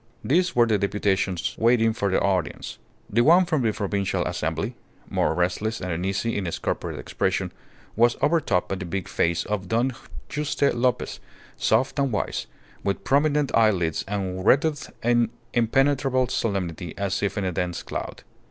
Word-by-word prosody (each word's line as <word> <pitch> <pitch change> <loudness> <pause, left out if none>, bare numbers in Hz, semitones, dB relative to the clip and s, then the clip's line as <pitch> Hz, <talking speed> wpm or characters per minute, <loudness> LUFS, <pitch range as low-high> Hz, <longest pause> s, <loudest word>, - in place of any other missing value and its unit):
These 175 +6 +2
were 120 -1 +6
the 110 -3 +1
deputations 100 -2 0
waiting 115 -1 +4
for 100 -3 -1
their 95 - +2
audience. 90 -5 -2 0.3
The 115 +4 +2
one 175 +8 +6
from 155 -5 0
the 115 -3 +2
Provincial 100 -2 -1
Assembly, - - -2 0.3
more - - 0
restless 95 +6 0
and 90 -1 -4
uneasy 95 +7 -1
in 95 -3 -2
its 85 - -3
corporate - - -3
expression, - - -1 0.4
was 120 +1 +4
overtopped 150 - +1
by 95 - -1
the 90 - -5
big 90 +2 -3
face 85 0 0
of 105 -3 -3
Don 120 +7 +1 0.4
Juste 145 -1 0
Lopez, 120 0 0 0.4
soft 135 +2 +1
and 140 -2 +1
white, 105 - -2 0.4
with 100 -1 -1
prominent 145 0 +2
eyelids 95 -8 +2
and 95 -2 -3
wreathed 145 - +2
in 120 -1 +3 0.2
impenetrable 130 +2 +2
solemnity 90 -5 -2
as 100 -2 -1
if 100 +1 -1
in 100 - 0
a 90 - 0
dense 90 0 -2
cloud. - - -6
110 Hz, 160 wpm, -25 LUFS, 95-130 Hz, 0.4 s, were